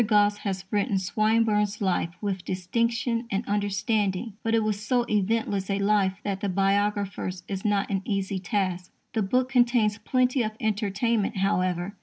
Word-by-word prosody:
Gosse 205 -1 +4
has 195 -2 -4
written 205 -1 +1
Swinburne's 210 +1 +1
life 185 -4 0
with 195 -3 -2
distinction 230 +7 -1
and 200 +3 -1
understanding; 205 +1 0
but 225 0 +1
it 225 - +2
was 210 -1 -1
so 240 +2 +1
eventless 205 -2 0
a 195 - +1
life 200 -1 +2
that 195 -2 -2
the 200 - -2
biographer's 195 -1 0
is 195 -1 -4
not 205 -2 +1
an 195 -1 0
easy 195 -1 -2
task. 185 -1 -2 0.2
The 225 - +1
book 250 +6 +1
contains 240 -4 +3
plenty 255 +3 +1
of 215 -1 -2
entertainment, 215 0 0
however. 185 0 0
205 Hz, 155 wpm, -26 LUFS, 195-220 Hz, 0.2 s, Gosse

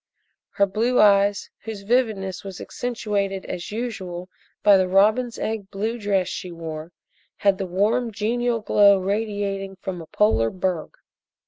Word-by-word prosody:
Her 200 - +3
blue 225 +6 +1
eyes, 200 -1 +4
whose 215 -3 -7
vividness 205 -5 0
was 195 -2 -8
accentuated 200 -5 -3
as 175 +2 -5
usual 190 -6 -5 0.3
by 205 -1 +7
the 185 -1 +2
robin's 215 +6 +3
egg 215 -3 -3
blue 220 +4 -3
dress 200 -3 +1
she 180 -1 -5
wore, 165 -1 -7 0.5
had 200 -2 +2
the 190 - -2
warm 210 +7 +1
genial 230 +2 0
glow 200 -1 +5
radiating 200 -1 -2
from 185 -2 -6
a 160 - -11
polar 155 - +2
berg. 180 -1 -3
200 Hz, 140 wpm, -23 LUFS, 190-220 Hz, 0.5 s, by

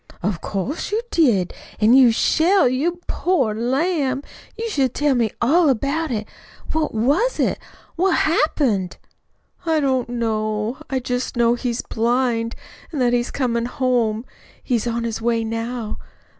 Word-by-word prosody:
"Of 190 -3 -1
course, 220 - -3
you 430 - +1
did! 225 - +2 0.3
An' 220 +2 +5
you 260 -2 +7
shall, 335 - +3
you 325 +8 -1
poor 275 -12 +1
lamb. 270 +4 0 0.3
You 455 +1 -3
shall 275 - +1
tell 290 +3 +1
me 235 -3 +1
all 315 +6 +4
about 280 +6 0
it. 215 -4 -3 0.4
What 315 -1 0
was 295 - +1
it? - - +1 0.4
What 370 +1 +3
happened?" 265 - +1 0.7
"I 325 -2 +1
don't 260 -4 0
know. 220 -1 -1
I 270 - 0
just 250 0 -3
know 235 0 +4
he's 240 -1 -2
blind, 235 0 0 0.4
an' 315 - -5
that 245 -2 +2
he's 240 0 +1
comin' 235 -3 -1
home. 240 -3 0 0.4
He's 240 -3 0
on 235 0 -1
his 225 -1 -3
way 230 0 +1
now. 230 0 -4
245 Hz, 145 wpm, -21 LUFS, 230-290 Hz, 0.7 s, you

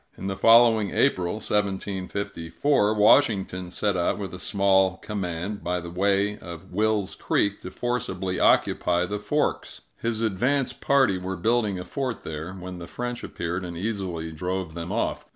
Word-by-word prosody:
In - - -7
the 95 0 -2
following 115 0 +6
April 90 -10 +1
(1754), 100 - -1
Washington 105 -5 +3
set 100 +3 -1
out 85 -1 +1
with 100 -4 -5
a 90 - -7
small 95 -1 +2
command, 95 0 -4
by 90 +1 -1
the 85 -1 -8
way 100 +3 +1
of 85 +1 -10
Will's 105 0 0
Creek, 100 0 0
to 90 - -6
forcibly 95 -6 -2
occupy 90 0 +3
the 105 +3 -3
Forks. 150 +8 -1 0.2
His 115 -1 -1
advance 125 +6 +1
party 135 -9 +2
were 95 +1 -4
building 110 +1 +1
a 90 - -6
fort 130 +3 -3
there, 80 +3 -5
when 90 -1 -8
the 85 - -8
French 120 0 -5
appeared 85 +2 -4
and 85 -2 -6
easily 90 -5 -3
drove 90 +1 -3
them 85 +2 -5
off. 115 - -1
95 Hz, 155 wpm, -25 LUFS, 90-110 Hz, 0.2 s, following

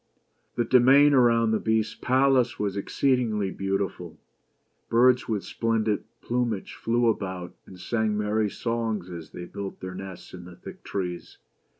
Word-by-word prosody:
The 120 - 0
domain 135 +5 +6
around 115 -3 +4
the 110 - +1
Beast's 110 -1 0
palace 130 -1 +2
was 100 -2 -2
exceedingly 110 -2 0
beautiful. 95 -3 -3 0.7
Birds 125 +2 +4
with 105 -3 -1
splendid 110 -2 -1 0.2
plumage 120 -4 -2
flew 120 +1 0
about, 95 -5 -2
and 95 - -13
sang 110 0 -1
merry 105 0 0
songs 110 -4 -3
as 85 -3 -8
they 90 - -8
built 100 +2 -7
their 95 0 -6
nests 95 -1 -9
in 90 -1 -9
the 90 -1 -11
thick - - -12
trees. 90 -3 -5
110 Hz, 140 wpm, -26 LUFS, 95-120 Hz, 0.7 s, domain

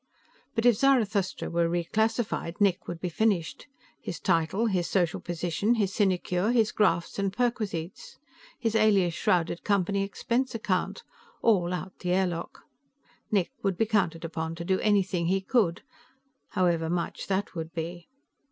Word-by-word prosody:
But 225 0 0
if 240 -4 +6
Zarathustra 215 -8 +1
were 170 0 +2
reclassified, 205 +1 -1
Nick 200 -3 +2
would 170 - -5
be 180 - -3
finished. 180 - 0 0.3
His 165 - -5
title, 165 +9 +1
his 185 -6 0
social 175 -4 +1
position, 175 +6 0
his 200 -4 0
sinecure, 185 -1 +1
his 225 -3 +3
grafts 180 -3 +1
and 195 -1 0
perquisites, 230 - -3 0.4
his 225 -3 -1
alias 205 -6 +3
shrouded 170 0 0
Company 200 -1 +1
expense 235 +5 -1
account 195 -5 -1 0.4
all 185 -6 +3
out 185 +1 -5
the 180 -1 -1
airlock. 180 -3 -2 0.7
Nick 195 -5 +1
would 195 -3 0
be 225 - +2
counted 185 -7 0
upon 160 0 -4
to 170 +1 -6
do 190 +1 +1
anything 190 -5 +1
he 190 +2 +2
could 190 -3 +1 0.7
however 170 -4 +1
much 175 0 -3
that 195 +1 -1
would 165 -2 -5
be. 170 +1 -5
190 Hz, 145 wpm, -28 LUFS, 170-215 Hz, 0.7 s, if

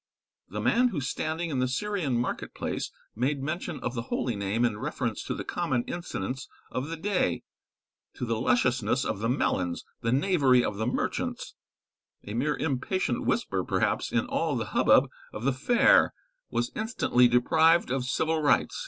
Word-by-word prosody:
The - - -4
man 250 +2 +4
who 190 -11 -2
standing 160 +4 -2
in 135 - -1
the 130 - +2
Syrian 155 -1 -1
market 120 - -3
place - - -3 0.2
made 135 +4 0
mention 160 +2 -3
of 125 - -2
the 115 - -2
holy 120 -3 -1
name 100 +4 0
in 105 -3 -1
reference - - -3
to - - -2
the - - -4
common 120 -2 -1
incidents 130 - -5 0.2
of 130 +3 -3
the 165 +1 -5
day 195 +3 0 0.7
to - - -3
the 115 -1 -1
lusciousness 125 0 +2
of - - -2
the 115 +2 -1
melons, 90 -9 0 0.2
the 115 -1 0
knavery 135 -4 +4
of 105 - -3
the 110 +2 -1
merchants 125 - -2 0.7
a 105 - -7
mere 145 +6 0
impatient 145 -1 -1
whisper, - - 0
perhaps, - - 0
in - - +1
all - - -1
the - - -1
hubbub - - +5 0.3
of 105 - -6
the 135 +1 +2
fair, 240 - +4 0.3
was 120 - -1
instantly 215 - +3
deprived 160 +6 +4
of 130 -1 0
civil 160 +4 0
rights. 145 - +2
130 Hz, 170 wpm, -28 LUFS, 120-160 Hz, 0.7 s, hubbub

